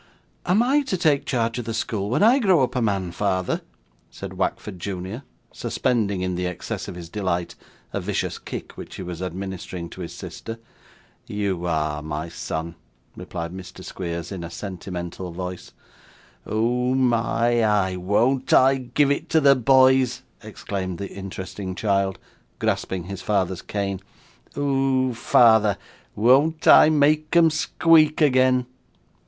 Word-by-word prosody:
'Am 195 +6 +4
I 275 +4 +3
to 260 -9 -2
take 155 -5 +2
care 115 -3 0
of 125 - -3
the 115 0 -4
school 105 -3 -2
when 125 - +2
I 240 +6 +6
grow 190 - +4
up 130 - -2
a 125 - +1
man, 100 -5 -1
father?' 95 -1 -1 0.5
said - - -8
Wackford 95 -4 -3
junior, 95 +5 -5 0.3
suspending, 105 -7 -1
in 90 0 -1
the 90 0 -2
excess 90 - -5
of - - -7
his 85 -1 -8
delight, 90 -2 -2 0.4
a - - -2
vicious - - -2
kick - - -7
which - - -9
he - - -6
was 90 -1 -6
administering 90 -2 -6
to 95 - -9
his 85 - -6
sister. 115 0 -8 0.7
'You 95 -4 -2
are, 75 -2 -1
my 75 +2 -4
son,' 85 0 -5 0.4
replied 85 +1 -6
Mr. 95 -1 -10
Squeers, 85 -2 -5
in 95 -3 -5
a 85 - -6
sentimental 90 -1 -6
voice. 90 +1 -6 0.8
'Oh 125 +4 0
my 120 -2 +2
eye, 100 -4 +2
won't 115 +9 +1
I 135 +1 +5
give 135 +3 +1
it 140 - -2
to 160 - +4
the 140 -2 +6
boys!' 130 0 +4 0.2
exclaimed 95 -4 -5
the 100 +1 -6
interesting 95 0 -6
child, 100 -2 0 0.4
grasping 95 -2 -1
his 95 +2 -7
father's 95 -3 0
cane. 100 -2 -3 0.6
'Oh, 135 -2 +1
father, 110 -3 +4 0.4
won't 140 +9 +3
I - - +8
make 155 +1 +2
'em 165 -2 +6
squeak 155 0 +3
again! 130 -4 +3
105 Hz, 150 wpm, -23 LUFS, 90-130 Hz, 0.8 s, I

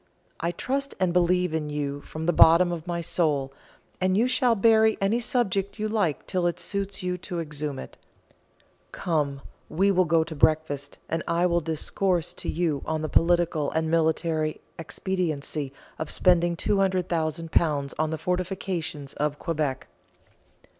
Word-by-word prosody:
"I 170 - -1
trust 275 +10 -2
and 185 -2 +1
believe 180 -1 +2
in 155 -2 -2
you 145 -1 -3
from 155 +2 -6
the 175 - +2
bottom 170 +3 +6
of 170 0 -5
my 170 -1 -2
soul, 150 -5 0 0.5
and 185 +1 +2
you 235 +4 +3
shall 250 -2 +3
bury 220 +1 +4
any 200 +4 +1
subject 210 -5 -1
you 215 0 -1
like 205 -9 0
till 180 -2 0
it 175 - -2
suits 200 -1 -3
you 180 0 -2
to 175 0 -5
exhume 150 -3 -4
it. - - -9 0.9
Come, 145 -5 -1 0.3
we 195 +5 +2
will 185 -1 +3
go 165 0 +3
to 160 0 -7
breakfast, 145 -2 +1
and 165 +1 -1
I 170 +1 +2
will 170 -1 +2
discourse 165 +2 -1
to - - -6
you 160 -4 0
on 155 0 -2
the 155 - -2
political 170 -3 +2
and 160 0 -1
military 160 -1 +1 0.2
expediency 155 -5 -3 0.3
of 155 -1 -3
spending 175 -1 +3
£200,000 165 -6 0
on 155 0 +1
the 160 - -2
fortifications 180 -5 -3
of 145 0 -1
Quebec." 150 -6 -2
170 Hz, 155 wpm, -26 LUFS, 155-185 Hz, 0.9 s, bottom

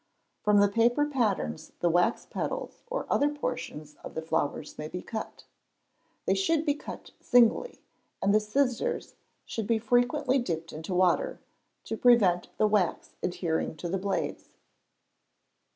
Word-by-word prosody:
From 210 0 +4
the 205 - +6
paper 235 +7 +3
patterns 215 - -1
the 175 - +2
wax 175 +7 +2
petals - - -4
or - - -3
other 290 - +3
portions 155 - -5
of - - -8
the 160 - -2
flowers 160 -2 -2
may 150 - -4
be 180 +3 -6
cut. 220 -2 -6 0.8
They - - +3
should 330 -5 +1
be 290 - +3
cut 295 - -9
singly, 245 - +3 0.4
and 200 - +2
the 215 - +6
scissors 250 - -1 0.3
should 220 -3 -4
be 230 0 +3
frequently 245 +4 +2
dipped 165 -8 -3
into 160 +4 -4
water, 185 - +2 0.4
to 225 - -4
prevent 205 -9 +4
the - - +4
wax 210 -4 +1
adhering 170 -3 -1
to 175 - -4
the 190 +3 -1
blades. 195 +1 -2
215 Hz, 145 wpm, -29 LUFS, 175-250 Hz, 0.8 s, the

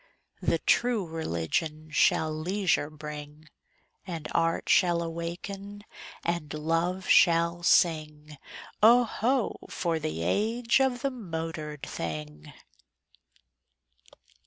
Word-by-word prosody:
The - - +1
True 235 -5 +1
Religion 155 - -3
shall 155 +1 +3
leisure 175 -1 0
bring; 150 0 -9 0.6
And 165 -4 -5
Art 165 0 0
shall 175 -2 +3
awaken 195 +5 -6 0.4
and 170 -4 -2
Love 165 +4 -1
shall 170 -1 +4
sing: 150 -4 +1 0.4
Oh, 235 +3 +7
ho! 240 +1 0
for 170 -2 -1
the 80 - -3
age 225 - +1
of 255 -2 0
the 275 - +1
motored 165 - -6
thing! 75 - -6
165 Hz, 95 wpm, -28 LUFS, 150-195 Hz, 0.6 s, Oh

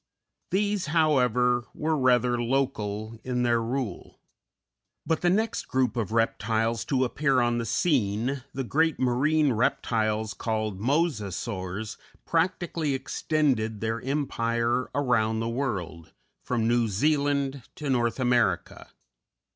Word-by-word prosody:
These, 205 -1 0
however, 125 -6 +2
were 160 +1 0
rather 125 -3 +2
local 115 -4 -2
in 125 -1 -1
their 120 -1 +2
rule; 120 -4 -4 0.9
but 160 - 0
the 175 - +3
next 220 +5 0
group 130 -3 +1
of 110 -4 -2
reptiles 115 0 0
to 130 -2 +1
appear 135 +1 +1
on 120 -1 +1
the 115 - -3
scene, 120 - 0
the 135 - -3
great 160 +5 +1
marine 140 +3 +2
reptiles 110 -2 0
called 110 -4 -2
Mosasaurs, 110 - -2 0.3
practically 165 -3 0
extended 130 -5 0
their 115 +1 -2
empire 120 -3 -1
around 115 -6 +1
the 115 - -2
world, 100 - -4 0.3
from 115 -3 -1
New 120 -1 +2
Zealand 140 +4 +1
to 150 - -6
North 120 -2 +1
America. 120 -8 0
125 Hz, 115 wpm, -27 LUFS, 110-140 Hz, 0.9 s, the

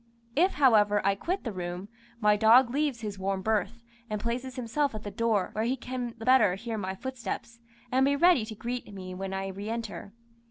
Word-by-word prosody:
If, 360 +6 +3
however, 210 -7 +4
I 200 - +4
quit 355 - -3
the 235 - -3
room, 180 0 -5 0.3
my 210 -2 +4
dog 235 +4 +6
leaves 280 -3 0
his 205 -3 -5
warm 190 0 -2
berth, 220 +2 -1 0.3
and 210 -1 -2
places 245 +3 -3
himself 255 +2 -1
at 215 - -6
the 205 - -5
door, 225 -5 0
where 215 - -1
he 255 +3 0
can 245 -1 -5
the 225 - -8
better 230 -8 +5
hear 225 +3 -5
my 190 -1 -3
footsteps, 235 -1 -6 0.3
and 260 +1 +3
be 280 +1 +3
ready 340 -4 +5
to 220 - -7
greet 235 +1 -5
me 185 -2 -7
when 190 +1 -5
I 195 0 -3
re 200 +3 -6
enter. 225 -3 -5
225 Hz, 205 wpm, -28 LUFS, 200-255 Hz, 0.3 s, dog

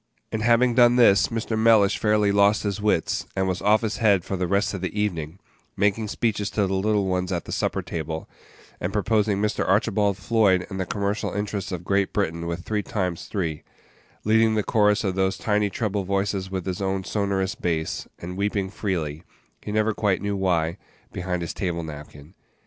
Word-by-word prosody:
And 110 - -2
having 120 +2 +4
done 120 0 +5
this, 115 -5 +5
Mr. 115 -1 -3
Mellish 110 -3 +4
fairly 105 -1 +3
lost 100 +1 +3
his 105 0 -2
wits, 105 -6 0
and 95 0 0
was 90 -1 -2
"off 105 +1 +4
his 110 -2 -2
head" 100 -5 +3
for 95 - -3
the 90 -1 -1
rest 100 +3 +1
of 95 - -4
the 95 +3 -3
evening, 85 -5 -2 0.4
making 105 +2 +1
speeches 105 -1 -1
to 105 - 0
the 95 - -2
little 100 +1 +1
ones 90 0 -1
at 85 -2 -2
the - - -8
supper - - -1
table, 80 -1 -5 0.5
and - - -2
proposing 105 -2 +1
Mr. 105 0 0
Archibald 100 0 +2
Floyd 100 -4 +2
and 95 - -4
the 95 - -2
commercial 100 +1 -2
interests 105 -1 -3
of 90 -2 -4
Great 100 +1 0
Britain 85 -4 -1
with 85 +1 -3
three 105 -1 -1
times 90 -4 -3
three; 85 -7 -3 0.6
leading 110 +1 +3
the 105 - +1
chorus 105 -2 +2
of 95 -3 0
those 95 0 0
tiny 105 -1 +1
treble 100 -1 -2
voices 95 0 -1
with 95 -2 -4
his 95 0 -3
own 95 0 -1
sonorous 100 -1 -1
bass, 80 -2 -2
and 90 +2 -7
weeping 100 -1 -1
freely 85 -8 -3 0.4
he - - -6
never 110 +1 +1
quite 100 -3 +1
knew 100 0 -2
why 90 -2 0 0.3
behind 90 -1 -3
his 85 - -4
table 85 -3 -2
napkin. 75 0 -10
100 Hz, 190 wpm, -24 LUFS, 90-105 Hz, 0.6 s, done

